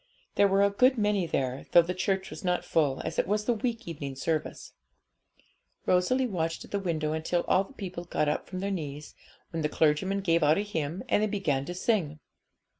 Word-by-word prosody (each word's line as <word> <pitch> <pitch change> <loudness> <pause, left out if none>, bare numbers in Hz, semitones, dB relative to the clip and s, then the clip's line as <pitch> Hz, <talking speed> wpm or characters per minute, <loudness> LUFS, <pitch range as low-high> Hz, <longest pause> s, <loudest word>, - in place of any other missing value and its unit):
There 200 - +4
were 195 +1 +3
a 200 - +3
good 255 +6 +4
many 205 -4 +1
there, 130 -3 -2
though 170 - +8
the 180 +2 -3
church 190 +1 -1
was - - -8
not 180 -1 0
full, 145 -5 +1
as - - -2
it - - +1
was 210 +2 0
the 240 - +3
week 230 0 -3
evening 140 -5 -5
service. 155 +3 -3 1.1
Rosalie 185 +9 +2
watched 165 -7 -2
at - - -18
the 200 - 0
window 155 -5 -1
until 160 +2 0
all 190 +1 +3
the 275 - -17
people 185 -7 -6
got 155 -3 0
up 150 - -1
from 185 -1 -5
their 200 +1 -1
knees, 150 -5 -5 0.4
when 165 - -3
the 150 - 0
clergyman 160 +7 +1
gave 170 -3 +2
out 150 +1 +4
a - - +1
hymn, 170 -3 -3
and 210 - +2
they 215 - +2
began 160 -10 -1
to 175 - -5
sing. 180 -7 0
180 Hz, 210 wpm, -28 LUFS, 155-200 Hz, 1.1 s, though